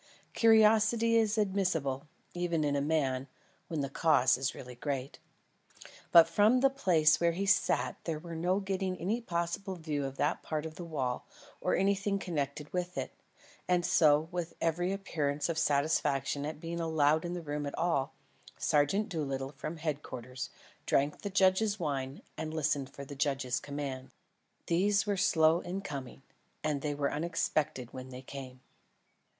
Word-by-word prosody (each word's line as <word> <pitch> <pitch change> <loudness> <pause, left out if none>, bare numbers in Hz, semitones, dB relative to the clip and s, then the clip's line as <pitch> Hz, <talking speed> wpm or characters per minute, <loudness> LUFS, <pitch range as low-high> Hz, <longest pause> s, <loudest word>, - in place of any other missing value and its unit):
Curiosity 225 +1 +5
is 220 -1 +3
admissible, 180 -9 0 0.3
even 175 -3 0
in 145 -1 +1
a 140 - +1
man, 140 -3 0 0.4
when 160 -3 -2
the 140 - -1
cause 140 -3 +4
is 130 0 -2
really 125 -1 -9
great. 135 +1 -4 0.9
But 165 -1 +9
from 210 +9 +4
the 270 0 +5
place 160 - +3
where 170 0 +3
he 195 +4 -2
sat 195 0 +2
there 165 -2 -1
was 165 +2 -8
no 180 +4 +1
getting 190 -1 -2
any 210 +8 -1
possible 170 0 -2
view 155 -4 -3
of 135 0 -6
that - - 0
part 155 -1 -3
of 160 - -6
the 175 - -8
wall 135 -7 -3 0.3
or - - +1
of - - +1
anything 200 +1 +1
connected 150 -5 -4
with 180 0 -3
it; - - -3 0.5
and 180 -1 +2
so, 155 0 +4
with 175 -1 -4
every 175 +3 0
appearance 150 -7 -2
of 160 -1 0
satisfaction 140 -1 +1
at 155 0 -6
being 170 +1 -5
allowed 160 -1 +2
in 175 0 -3
the 175 - -5
room 145 -1 -3
at 140 - -6
all, 165 -6 0 0.4
Sergeant 150 +9 +2
Doolittle 135 -5 -3
from 155 +3 -6
Headquarters, 130 -5 -5 0.4
drank 145 +2 +1
the 200 - -3
judge's 195 +2 +3
wine 140 -4 -3 0.2
and 160 0 -4
listened 145 -3 0
for 140 - -9
the 145 - -8
judge's 135 -3 0
commands. 140 -2 -5 0.5
These 200 +5 +2
were 205 -1 0
slow 165 -3 +4
in 185 +3 -4
coming, 135 -7 -7 0.4
and 150 -2 0
they 145 0 -2
were 145 -1 -1
unexpected 155 -5 -1
when 130 0 -7
they 130 0 -9
came. 130 -1 -9
160 Hz, 165 wpm, -31 LUFS, 140-180 Hz, 0.9 s, But